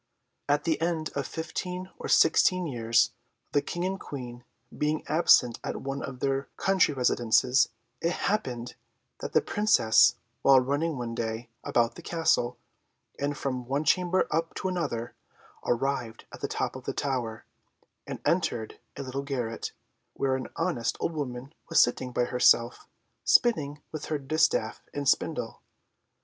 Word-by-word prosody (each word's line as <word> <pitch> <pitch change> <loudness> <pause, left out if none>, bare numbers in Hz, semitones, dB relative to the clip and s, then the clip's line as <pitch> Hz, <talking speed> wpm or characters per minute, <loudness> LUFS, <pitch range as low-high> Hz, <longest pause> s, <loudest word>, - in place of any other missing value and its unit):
At 145 +1 +2
the 165 -1 0
end 165 -2 -1
of 140 -1 -2
fifteen 180 +3 -5
or - - -5
sixteen 185 +2 +4
years, 115 -5 +2 0.4
the 145 - +3
King 175 +4 -3
and 190 +1 -2
Queen, 125 -3 -7 0.3
being 150 +1 0
absent 140 -6 +4
at - - -4
one 135 0 -3
of 130 -2 -7
their 135 0 0
country 190 -6 +3
residences, 125 0 +3 0.3
it 170 +1 +1
happened 125 - -2 0.5
that - - -6
the - - +4
Princess, 205 - +4 0.3
while 135 -1 +7
running 145 +4 -1
one 120 -2 -4
day 115 0 -4
about 120 -1 +1
the - - -11
castle, 125 -7 +1 0.6
and 145 +1 -1
from 130 -4 -3
one 140 +3 0
chamber 180 +4 +2
up 165 +1 -1
to - - -2
another, 145 -11 -2 0.5
arrived 120 -2 -1
at - - -10
the - - -1
top - - -2
of - - -10
a - - -1
tower, 125 -5 -2 0.6
and - - -5
entered 110 -2 0 0.2
a 140 - -4
little 135 +1 -4
garret, 125 -5 -3 0.4
where 135 -1 +1
an 130 - -4
honest 165 -8 -1
old 170 - -1
woman 135 -2 -5 0.2
was 165 - +4
sitting 125 +1 +2
by 125 - +1
herself, 120 -1 +3 0.4
spinning 150 -11 +3
with 155 -2 -5
her 155 - -1
distaff 145 -5 +1
and 145 -1 -2
spindle. - - 0
140 Hz, 150 wpm, -28 LUFS, 120-160 Hz, 0.6 s, while